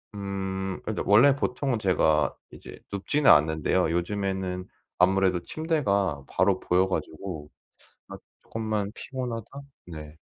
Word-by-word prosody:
음 95 -1 -4
근데 110 - -3
원래 120 +8 +6
보통은 135 -1 -1
제가 80 -6 +2 0.2
이제 - - -12
눕지는 135 +9 +1
않는데요. 80 +3 +3
요즘에는 95 0 -2 0.3
아무래도 95 -1 +3
침대가 100 - 0
바로 95 -1 +2
보여 90 +2 +2
가지고 80 -4 -5 0.6
아 - - -7 0.3
조금만 110 -2 -3
피곤하다? 125 -4 -5 0.5
네. 75 0 -9
95 Hz, 270 characters per minute, -26 LUFS, 90-110 Hz, 0.6 s, 원래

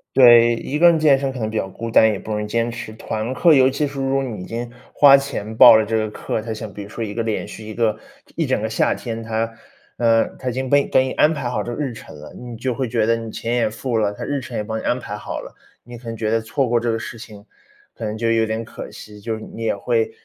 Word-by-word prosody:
对， 120 -2 +7
一 145 +5 -4
个 175 +1 +8
人 165 - +3
健 145 -3 +4
身 135 -1 -1
可 130 - -8
能 110 -1 -2
比 110 - -7
较 95 -2 -1
孤 115 +3 -6
单， 110 -1 +6
也 100 - -3
不 110 - -8
容 105 0 -1
易 - - -5
坚 115 +2 -1
持。 115 -2 -7
团 110 +1 -4
课， 170 +3 +5
尤 130 -2 +5
其 140 +3 -1
是 140 -1 -6
如 135 0 0
果 135 - +1
你 115 -7 -5
已 - - -7
经 120 +1 -5 0.2
花 140 -1 +7
钱 110 -6 -3
报 - - +9
了 110 -1 +3
这 110 +1 -2
个 110 -1 -1
课， 110 - -4
它 115 +1 -6
像 110 -1 -6
比 105 - -8
如 100 - -9
说 115 - -5
一 105 -2 -5
个 115 - -2
连 110 -2 -2
续 110 - -10
一 110 0 -8
个 110 -3 +1 0.4
一 165 -4 -1
整 130 - +1
个 110 - -2
夏 - - +1
天， 115 -2 -5
它， 115 0 -2 0.4
呃， 115 -1 +3
它 130 - -3
已 - - -2
经 130 +1 -3
被 140 +1 +4
给 130 - +3
你 130 - -3
安 155 - +3
排 140 -6 -3
好 110 -4 -1
这 120 +3 -5
个 - - -8
日 135 -5 -2
程 75 -8 -12
了， 75 - -11
你 120 -2 -9
就 125 +1 -2
会 130 -1 -3
觉 110 -2 +1
得 115 - +3
你 115 -1 -6
钱 115 - -3
也 120 -3 +1
付 120 +1 -3
了， 105 -1 +1
它 105 - -8
日 140 -1 -2
程 120 -1 -6
也 - - -1
帮 110 +1 -4
你 - - -8
安 125 - 0
排 105 - -6
好 105 - -6
了， - - -11 0.3
你 120 +1 -11
可 120 +1 -13
能 115 -1 -5
觉 110 0 -1
得 115 - +2
错 125 +4 -1
过 120 0 +2
这 120 0 -1
个 115 - -1
事 115 0 -7
情， 105 -2 -12 0.5
可 - - -10
能 110 0 -3
就 115 0 0
有 110 -1 +2
点 110 +1 -3
可 - - -9
惜。 105 -1 -12
就 110 +1 -3
是 110 - -9
你 115 - -9
也 115 - 0
会 115 +2 0
115 Hz, 325 characters per minute, -21 LUFS, 110-130 Hz, 0.5 s, 报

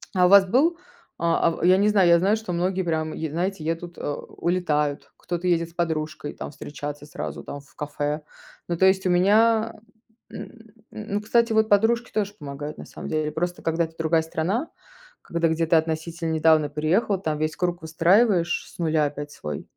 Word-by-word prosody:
А 180 -1 +5
у - - +2
вас 200 -1 +8
был, 310 - +3 0.4
а 170 0 +2
а - - +3
в 165 - -6
я 185 +2 +6
не 205 +2 +3
знаю, 195 -4 +4
я 170 - +7
знаю, 200 +4 +3
что 220 -4 -6
многие 185 +2 0
прям, 160 -2 -2
е 160 -1 -4
знаете, 180 +1 -2
едут, 165 +2 -4
у - - -7 0.4
улетают, 150 -5 -1
кто-то 175 +1 -4
едет 170 -1 +1
с - - -21
подружкой 160 -3 -3
там - - -7
встречаться 145 0 -7
сразу 150 - -6
там 145 - -7
в 140 - -21
кафе. 150 +1 -3 0.5
Ну, 175 - -1
то 190 - +4
есть 190 0 +2
у - - +2
меня, 220 +5 +3 0.6
м - - -7
м, 225 -2 -13 0.4
ну, 205 - 0
кстати, 230 +1 +2
вот 220 0 +3
подружки 225 +4 +2
тоже 205 -1 -1
помогают, 145 0 -7
на - - -8
самом - - -9
деле. 155 -1 -1
Просто, 175 +3 -3
когда 165 +1 0
это 160 0 -6
другая 160 0 +2
страна, 185 - -2 0.5
когда 170 0 0
где 165 0 0
ты 165 - +3
относительно 160 +1 -1
недавно 155 -2 +3
переехал, 180 +7 0
там 155 -3 -1
весь 155 +1 -2
круг 175 -1 -2
выстраиваешь 175 +2 +2
с - - -17
нуля 155 -2 +2
опять 145 0 -5
свой. 75 - -6
170 Hz, 195 wpm, -24 LUFS, 155-190 Hz, 0.6 s, вас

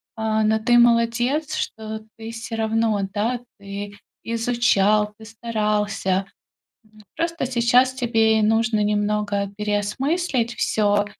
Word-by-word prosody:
А, 220 -1 0
но 220 +1 +2
ты- 240 +2 +3
молодец, 240 +5 +2
что 220 0 -4 0.2
ты 225 0 -7
всё 230 0 -6
равно, 220 -1 +1
да, 230 +4 -1 0.2
ты 200 0 -7 0.3
изучал, 225 -3 +2
ты 220 - -13
старался. 210 -4 -1 0.7
М, 215 - -17
просто 335 -4 -2
сейчас 250 +1 +3
тебе 225 -3 +2
нужно 225 0 +2
немного 205 -1 0
переосмыслить 235 - -1
всё 205 -1 +1
220 Hz, 115 wpm, -22 LUFS, 210-235 Hz, 0.7 s, ты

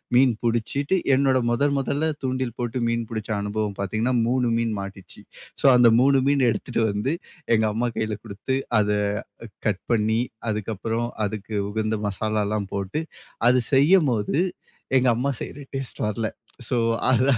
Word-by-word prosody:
மீன் 125 -1 +5
புடிச்சிட்டு, 130 - 0 0.2
என்னோட 135 -1 +3
முதல், 140 +4 +2
முதல்ல 145 +4 0
தூண்டில் 130 -2 -2
போட்டு 120 +1 -2
மீன் 115 0 -1
புடிச்ச 110 0 -4
அனுபவம் 105 0 -2
பாத்தீங்கன்னா, 110 +6 0
3 125 -1 +1
மீன் 115 -1 0
மாட்டுச்சு. 100 -1 -9 0.4
ஸோ, - - +1
அந்த 120 -1 +7
3 135 0 +5
மீன் 140 -3 +3
எடுத்துட்டு 115 +1 -1
வந்து 105 +9 -1 0.4
எங்க 110 0 +2
அம்மா 120 +2 0
கையில 110 -1 -2
குடுத்து, 115 +5 -3 0.2
அத 105 0 +2 0.5
அ - - -6 0.2
கட் 100 -3 0
பண்ணி, 110 +1 +2 0.3
அதுக்கப்புறம் 110 +3 -2 0.2
அதுக்கு 105 +1 -5
உகந்த 110 +1 -1
மசாலாலாம் 105 0 -1
போட்டு, 100 +10 -2 0.5
அது 125 0 +5
செய்யும்போது 140 - +3 0.6
எங்க 130 0 +2
அம்மா 140 +3 0
செய்யுற 145 - -7
டேஸ்ட்டு 135 -5 -4
வரல. 110 +1 -1 0.4
ஸோ 125 - +1 0.4
அத 125 +1 +3
115 Hz, 145 wpm, -24 LUFS, 105-130 Hz, 0.6 s, அந்த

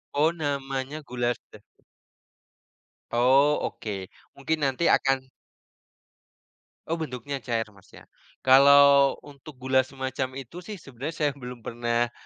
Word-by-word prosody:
Oh, 155 +3 +4
namanya 140 -2 -4
gula 120 -3 -1
stevia. - - -21 1.3
Oh, 135 +5 +4
oke. 100 -4 -6 0.3
Mungkin 155 +3 -1
nanti 135 +4 0
akan 135 -1 +2 1.6
Oh, 165 +1 -2
bentuknya 140 -1 -5
cair, 115 -2 -1
Mas, 100 -2 -21
ya? - - -14 0.4
Kalau 140 +1 +7
untuk 145 0 -13
gula 130 +1 +1
semacam 130 0 -3
itu 135 +6 -8
sih 210 - -5
sebenarnya 140 0 -7
saya 145 -1 +2
belum 125 -4 -10
pernah 120 0 -1
135 Hz, 115 wpm, -26 LUFS, 125-145 Hz, 1.6 s, Kalau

